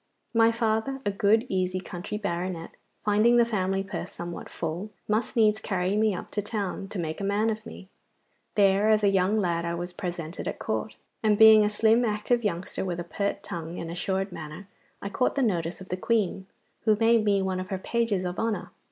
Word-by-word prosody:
My 230 0 +5
father, 230 +3 0
a 205 - +2
good, 215 +3 +3
easy 185 -2 0
country 185 +2 -6
baronet, 175 -4 -3 0.3
finding 215 +3 +4
the 235 - +6
family 195 -3 0
purse 195 -2 -6
somewhat 175 0 -7
full, 170 +5 -4 0.2
must 215 +5 0
needs 215 -2 +3
carry 185 -1 0
me 215 -2 +2
up - - -7
to 210 - -1
town 200 -2 -3
to 205 - -7
make 160 +1 -3
a - - -3
man 205 +3 +1
of 215 0 -5
me. 190 - -10 0.7
There 200 +1 +4
as 215 -1 +4
a 200 - +5
young 195 +2 +2
lad 170 -3 0
I 170 0 -2
was 175 +1 -5
presented 175 -3 -5
at - - -3
Court, - - -3 0.3
and 215 -2 +3
being 220 0 +9
a 210 - +2
slim 220 +3 +3
active 230 +2 0
youngster 185 -3 -2
with 175 -2 -3
a - - -2
pert 200 +4 -3
tongue 165 0 -6
and 165 - -5
assured 190 +2 -2
manner, 155 +4 -8 0.4
I 200 - -3
caught 250 - 0
the 275 - +2
notice 175 -5 -1
of 185 - -10
the 180 - -2
Queen, 195 -2 0 0.4
who 215 -1 +5
made 225 +1 +4
me 200 -2 +2
one 190 -1 -1
of 185 - -5
her 190 - -2
pages 210 -2 0
of 180 0 -3
honour. 225 -2 -2
200 Hz, 205 wpm, -27 LUFS, 180-215 Hz, 0.7 s, being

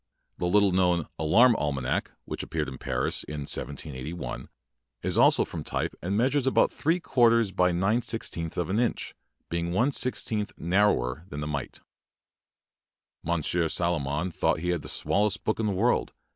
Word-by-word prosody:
The 90 - 0
little 100 +1 +4
known 90 -3 +2
"Alarm 115 +11 +5
Almanac", 70 -3 -1 0.2
which - - -5
ap - - -10
peared 75 -5 -2
at 65 - -10
Paris - - -1
in 75 -1 -6
1781, 70 0 -4 0.5
is - - -1
also - - +5
from - - -6
type - - -2
and 95 +3 -1
measures 135 +3 +2
about 130 - +3
three 165 +4 +1
quar 125 -8 +4
ters 115 -3 +2
by 90 -1 +2
nine 95 +7 +1
sixteenths 85 -9 -3
of 90 +1 -1
an 105 - +1
inch, 120 -1 -1 0.4
being 85 0 -2
one 120 +9 +2
sixteenth 110 -5 -1
narrower 85 -6 +1
than 75 - -6
"The 75 - -3
Mite". 70 -2 -5 1.4
Monsieur 85 +1 +1
Salomon 80 0 0
thought 80 -1 0
he 90 - -2
had 85 -3 0
the - - -8
smallest 105 -1 0
book 110 - -1
in 110 - +1
the - - +1
world. 110 +6 +1
90 Hz, 170 wpm, -27 LUFS, 75-105 Hz, 1.4 s, Alarm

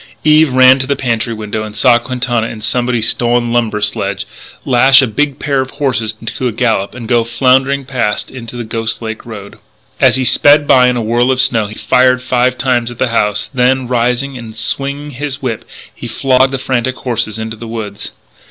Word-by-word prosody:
Eve 155 -1 +4
ran 130 +1 +6
to 130 - -2
the 140 - 0
pantry 115 -3 -2
window 110 -1 -4
and 105 -1 -7
saw 120 +2 +4
Quintana 120 -2 -2
in 115 - -8
somebody's 120 +1 0
stolen 120 0 0
lumber 115 -3 0
sledge, 100 -2 -2 0.4
lash 135 +2 +5
a 135 - +4
big 140 +4 -1
pair 140 -2 0
of 130 - -5
horses 115 -6 -1
to 125 +2 -3
a - - -1
gallop 110 -3 -1
and 120 -3 -8
go 120 -1 +2
floundering 130 +3 +1
past 120 -6 -2
into 120 -2 -9
the 120 - -4
Ghost 115 +1 -4
Lake 110 0 -6
road. 100 -3 -10 0.4
As 130 -2 +4
he 130 - 0
sped 145 +3 +4
by 125 -1 +5
in 125 0 +1
a 120 - -2
whirl 120 +3 +1
of 130 -1 +1
snow 120 -5 +2
he 105 - -10
fired 125 +4 +2
five 125 0 +1
times 125 -3 0
at 120 - -9
the 130 - 0
house, 105 -3 -1
then, 130 0 +1
rising 125 +2 -1
and 110 -2 -10
swinging 140 +2 -3
his 140 +1 -5
whip, 115 -4 -3 0.3
he - - -8
flogged 130 0 +2
the 135 - -2
frantic 130 -1 -2
horses 115 -4 -3
into 110 0 -5
the 115 +1 -9
woods. 110 -3 -6
120 Hz, 200 wpm, -14 LUFS, 115-130 Hz, 0.4 s, ran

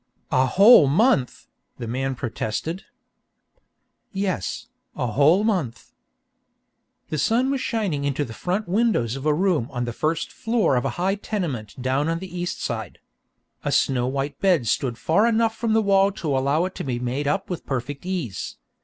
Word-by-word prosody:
"A 130 0 +3
whole 195 - +7
month!" 190 - +2 0.3
the - - -5
man 130 +3 -2
protested. 120 - -4 1.3
"Yes, 195 - -2 0.3
a - - -2
whole 145 - +4
month 175 - -2 0.6
" - - -49
The 155 - -1
sun 240 - +2
was 275 -2 -1
shining 200 - -1
into 140 +1 -1
the 115 - -9
front 185 - -2
windows 185 - +1
of 135 +2 -4
a 150 - +4
room 175 -8 +1
on 120 -3 -3
the 120 - -4
first 160 +5 -1
floor 225 - +1
of 125 - 0
a - - +1
high 185 +2 +1
tenement 140 - -4
down 130 +4 0
on 165 - 0
the 180 0 -8
east 175 0 -3
side. 110 -6 -4 0.7
A - - -1
snow 125 -2 +2
white 135 +1 -3
bed 180 -10 +3
stood 120 +1 0
far 205 - +2
enough 225 -1 +2
from 225 -1 -1
the 220 0 +3
wall 195 0 +4
to 160 -9 -2
allow 140 +6 +1
it 185 - -5
to - - -3
be 125 -3 -2
made 125 +4 -2
up 195 +6 0
with 175 - -5
perfect 135 +1 -4
ease. 175 - -4
155 Hz, 175 wpm, -23 LUFS, 130-195 Hz, 1.3 s, whole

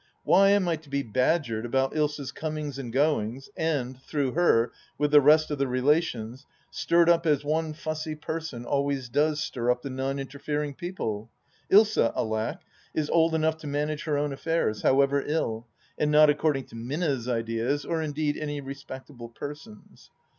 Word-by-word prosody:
Why 195 0 +5
am 200 -2 +3
I 165 -2 +1
to 155 -2 -18
be 140 0 -1
badgered 120 0 0
about 135 +2 0
Ilsa's 150 -3 -1
comings 150 -3 -4
and 120 -4 -6
goings 135 - 0
and, 130 -5 -2
through 140 -2 -1
her, 125 -8 +3 0.3
with 150 0 +1
the 150 -1 +8
rest 155 +2 +5
of 145 - -2
the 140 - +1
relations, 130 -2 0 0.2
stirred 170 0 +3
up 170 -1 +4
as 145 -1 +2
one 155 +1 0
fussy 155 0 -4
person 155 -5 -5
always 140 -2 -1
does 150 +4 +1
stir 120 -4 -2
up 125 0 +1
the 140 - -5
non 135 +1 -2
interfering 145 +2 -3
people? 135 - -4 0.4
Ilsa 210 - +5
— - - -22
alack 110 0 -1
I - - -32 0.2
— - - -32
is 150 - -2
old 165 -1 +3
enough 160 0 +1
to 155 - -9
manage 150 +1 -2
her 150 -3 0
own 145 -1 -1
affairs, 150 -7 -1
however 140 +1 +3
ill, 120 -7 -2 0.3
and 150 - +2
not 150 0 +6
according 150 -2 0
to - - -12
Minna's 130 +1 -2
ideas, 115 +4 -1
or 165 -1 -1
indeed 150 -1 -1
any 145 -1 -3
respectable 135 -2 -9
person's. 150 - -10
145 Hz, 175 wpm, -27 LUFS, 130-155 Hz, 0.4 s, the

